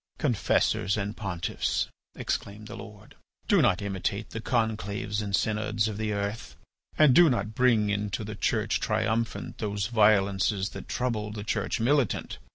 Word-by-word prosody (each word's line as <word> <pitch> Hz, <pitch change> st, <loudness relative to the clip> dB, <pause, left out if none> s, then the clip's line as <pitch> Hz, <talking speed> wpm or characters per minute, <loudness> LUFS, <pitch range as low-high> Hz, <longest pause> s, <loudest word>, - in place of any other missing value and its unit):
"Confessors 110 Hz, -, +1 dB
and 105 Hz, +1 st, -3 dB
pontiffs," 95 Hz, -4 st, -2 dB, 0.3 s
exclaimed 105 Hz, +2 st, -4 dB
the 115 Hz, -, -8 dB
Lord, 105 Hz, -3 st, -11 dB, 0.3 s
"do -, -, +5 dB
not 90 Hz, +3 st, +2 dB
imitate 100 Hz, +2 st, -3 dB
the 115 Hz, -, -5 dB
conclaves 110 Hz, -2 st, -1 dB
and 100 Hz, -2 st, 0 dB
synods 105 Hz, -1 st, 0 dB
of 105 Hz, -2 st, -4 dB
the 110 Hz, -1 st, -1 dB
earth. 100 Hz, +2 st, -3 dB, 0.4 s
And 150 Hz, -4 st, +6 dB
do 170 Hz, +4 st, +7 dB
not 110 Hz, -4 st, -1 dB
bring 115 Hz, -4 st, +3 dB
into 105 Hz, +1 st, -2 dB
the 105 Hz, +1 st, -5 dB
Church 100 Hz, -, 0 dB
Triumphant 115 Hz, +1 st, -1 dB
those 100 Hz, -2 st, -2 dB
violences 100 Hz, -2 st, +3 dB
that -, -, -9 dB
trouble 110 Hz, -4 st, -2 dB
the 105 Hz, -1 st, -6 dB
Church 110 Hz, -, -1 dB
Militant. 130 Hz, +1 st, +1 dB
105 Hz, 150 wpm, -28 LUFS, 100-115 Hz, 0.4 s, do